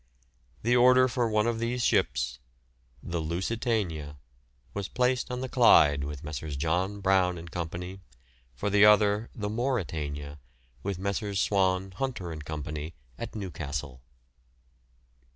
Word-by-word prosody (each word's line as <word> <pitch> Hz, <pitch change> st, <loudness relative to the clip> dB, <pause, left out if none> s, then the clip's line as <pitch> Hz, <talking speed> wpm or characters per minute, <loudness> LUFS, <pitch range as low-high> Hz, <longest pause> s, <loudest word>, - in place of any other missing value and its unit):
The 120 Hz, +2 st, +3 dB
order 125 Hz, +1 st, +6 dB
for 120 Hz, -2 st, 0 dB
one 105 Hz, 0 st, +2 dB
of 115 Hz, -1 st, 0 dB
these 120 Hz, +1 st, -1 dB
ships, 65 Hz, 0 st, +1 dB, 0.6 s
the 85 Hz, -1 st, -3 dB
"Lusitania," 85 Hz, -, -2 dB, 0.6 s
was 100 Hz, -1 st, -3 dB
placed 125 Hz, +1 st, 0 dB
on 125 Hz, 0 st, -3 dB
the 130 Hz, -, -2 dB
Clyde 75 Hz, -, +5 dB
with 75 Hz, +1 st, -6 dB
Messrs. 75 Hz, -1 st, -5 dB
John 90 Hz, +7 st, -1 dB
Brown 95 Hz, -2 st, +3 dB
and 85 Hz, 0 st, -9 dB
Co., 85 Hz, -1 st, -3 dB, 0.9 s
for 105 Hz, +9 st, -2 dB
the 105 Hz, 0 st, +5 dB
other, 105 Hz, +1 st, +5 dB
the 105 Hz, -2 st, -3 dB
"Mauretania," 80 Hz, -, -3 dB, 0.4 s
with 100 Hz, +2 st, -3 dB
Messrs. 100 Hz, +1 st, -2 dB
Swan, 95 Hz, 0 st, +1 dB
Hunter 95 Hz, -5 st, -4 dB
and 75 Hz, -2 st, -7 dB
Co., 75 Hz, -1 st, -5 dB, 0.6 s
at -, -, -6 dB
Newcastle. 75 Hz, -, -5 dB
95 Hz, 130 wpm, -28 LUFS, 80-115 Hz, 0.9 s, order